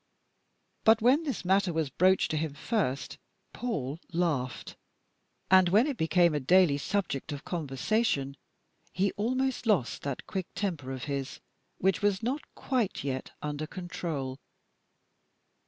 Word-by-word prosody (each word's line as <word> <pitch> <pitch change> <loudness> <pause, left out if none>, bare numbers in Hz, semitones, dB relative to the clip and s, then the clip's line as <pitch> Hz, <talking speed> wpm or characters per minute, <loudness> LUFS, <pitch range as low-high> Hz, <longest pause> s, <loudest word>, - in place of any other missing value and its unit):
But 220 0 +6
when 255 +7 +4
this 275 - -4
matter 190 0 +3
was 160 -4 -1
broached 185 +5 +3
to 155 - 0
him 155 -2 -2
first, 150 - -2 0.3
Paul 155 - -3
laughed, 160 -7 -1 0.8
and 185 -1 +7
when 210 +7 +5
it 290 -3 -1
became 170 -2 +3
a 150 - +1
daily 155 0 +4
subject 160 -5 -2
of 145 -1 -6
conversation, 150 - 0 0.6
he 190 +1 +1
almost 255 +3 -1
lost 175 - +1
that 140 -2 -4
quick 190 -4 -4
temper 165 -10 -2
of 130 -1 -5
his, 140 -1 -4 0.4
which 190 +1 +1
was 205 0 +1
not 265 +6 -1
quite 250 -7 -1
yet 130 -2 -3
under 150 +1 -3
perfect - - -16
control. 155 -7 -4
175 Hz, 140 wpm, -29 LUFS, 140-205 Hz, 0.8 s, and